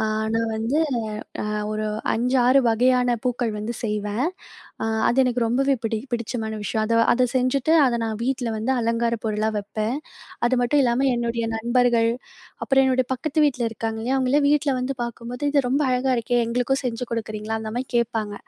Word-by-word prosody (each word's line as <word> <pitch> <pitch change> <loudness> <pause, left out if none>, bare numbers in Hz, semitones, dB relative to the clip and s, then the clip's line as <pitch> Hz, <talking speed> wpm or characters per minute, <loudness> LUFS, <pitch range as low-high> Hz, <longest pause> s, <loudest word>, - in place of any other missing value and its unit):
அ - - 0 0.3
நான் 225 0 0
வந்து 230 +7 0 0.6
அ - - -3 0.3
ஒரு 215 0 -2 0.3
5, 250 +3 +1
6 270 +2 +6
வகையான 245 +1 +3
பூக்கள் 245 -2 0
வந்து 220 +3 -4
செய்வேன். 210 +2 -1 0.6
அ - - 0 0.2
அது 240 - 0
எனக்கு 250 -1 0
ரொம்பவே 270 +3 +2
பிடி 220 -1 -1
பிடிச்சமான 225 -1 -3
விஷயம். 220 +1 -1
அத 230 +1 +2 0.2
அத 250 +1 +2
செஞ்சுட்டு 255 +4 +1
அத 245 - +1
நான் 220 -1 -4
வீட்ல 255 -2 -1
வந்து 235 +5 0
அலங்கார 230 0 0
பொருளா 215 0 0
வப்பேன். 215 +5 -2 0.5
அது 255 - 0
மட்டும் 280 +4 +3
இல்லாம 250 +3 +2
என்னுடைய 235 -1 -1
நண்பர்கள், 235 0 +2 0.5
அப்புறம் 270 -1 +3
என்னுடைய 255 -1 +1
பக்கத்து 285 +4 -2
வீட்ல 250 -3 -2
இருக்காங்க 225 0 -3
இல்லயா? 255 +4 0
அவுங்கலாம் 285 +3 +2
வீட்ல 295 -1 +2
வந்து 265 +2 -2
பார்க்கும்போது, 240 +2 -6
"இது 280 -3 +3
ரொம்ப 280 +3 +2
அழகா 255 +1 +1
இருக்கே! 240 +1 0
எங்களுக்கும் 250 +3 0
செஞ்சு 235 0 -2
கொடுக்குறீங்களா?" 215 -1 -3
அந்தமாரி 240 +4 -4
கேட்பாங்க. 220 -3 -1
240 Hz, 170 wpm, -23 LUFS, 225-255 Hz, 0.6 s, 6